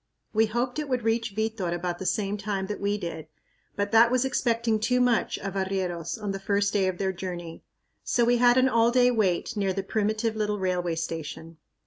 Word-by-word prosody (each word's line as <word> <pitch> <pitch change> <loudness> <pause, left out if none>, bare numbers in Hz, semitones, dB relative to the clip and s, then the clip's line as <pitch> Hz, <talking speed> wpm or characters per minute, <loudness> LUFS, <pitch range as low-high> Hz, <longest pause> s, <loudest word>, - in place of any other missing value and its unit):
We 220 +1 +3
hoped 240 +5 -2
it 300 -2 -4
would 250 -3 0
reach 225 -2 0
Vitor 220 -5 -1
about 175 0 -3
the 190 - -3
same 205 -2 0
time 200 -2 -3
that 210 +1 -5
we 205 +1 0
did, 165 -5 -6 0.5
but 205 0 -1
that 225 +1 +6
was 255 +1 +2
expecting 235 -3 +1
too 250 +4 +1
much 245 -2 +2
of 195 -1 -5
arrieros 190 -2 -2
on 205 -2 -3
the 195 - -4
first 200 +1 0
day 195 -2 +2
of 185 -1 -2
their 190 0 -1
journey. 175 -3 -6 0.4
So 240 - +2
we 240 +1 +3
had 245 +1 +5
an 260 0 +5
all 230 -2 +3
day 250 0 +4
wait 215 -1 0
near 195 -2 0
the 195 +1 -3
primitive 215 +2 -1
little 210 -1 -1
railway 180 -3 -1
station. 165 0 -5
205 Hz, 205 wpm, -26 LUFS, 190-230 Hz, 0.5 s, that